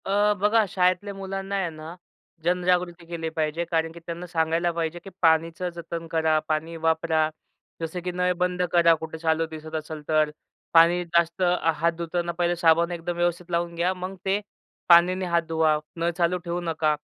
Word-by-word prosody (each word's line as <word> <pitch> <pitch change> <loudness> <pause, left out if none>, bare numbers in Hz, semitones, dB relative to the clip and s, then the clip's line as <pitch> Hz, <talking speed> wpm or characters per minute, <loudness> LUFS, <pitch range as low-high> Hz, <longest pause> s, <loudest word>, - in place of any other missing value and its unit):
अ, 205 +1 +3
बघा, 210 +2 +3
शाळेतल्या 185 +2 +1
मुलांना 195 0 -4
आहे 190 -3 0
ना, 160 +1 -9 0.5
जनजागृती 180 0 0
केली 165 -1 -4
पाहिजे. 160 +1 -2
कारण 165 -1 +1
की 170 - -11
त्यांना 170 +1 -6
सांगायला 165 0 +1
पाहिजे, 165 0 -3
की 195 - -9
पाणीचं 165 +2 +2
जतन 170 0 -6
करा, 160 -1 +2
पाणी 160 +1 -2
वापरा. 160 -1 +2 0.5
जसं 165 +2 -3
की 180 - -2
नळ 180 0 +1
बंद 180 0 0
करा. 170 -1 +5
कुठे 160 0 -6
चालू 160 0 +1
दिसत 160 0 -8
असेल 155 0 -5
तर. 155 -1 +3 0.4
पाणी 170 +2 +6
जास्त 170 +1 +1 0.3
हात 165 +2 +2
धुताना 170 +1 -2
पाहिलं 175 0 0
साबण 170 0 +3
एकदम 175 0 -4
व्यवस्थित 175 0 -1
लावून 170 0 -1
घ्या. 175 +2 +1
मग 185 +1 -6
ते 195 +1 +2 0.5
पाण्याने 180 +2 +6
हात 170 -1 +2
धुवा. 160 -1 +2 0.2
नळ 170 0 0
चालू 175 0 +2
ठेवू 170 +1 -2
नका 160 -2 0
170 Hz, 170 wpm, -25 LUFS, 160-180 Hz, 0.5 s, पाणी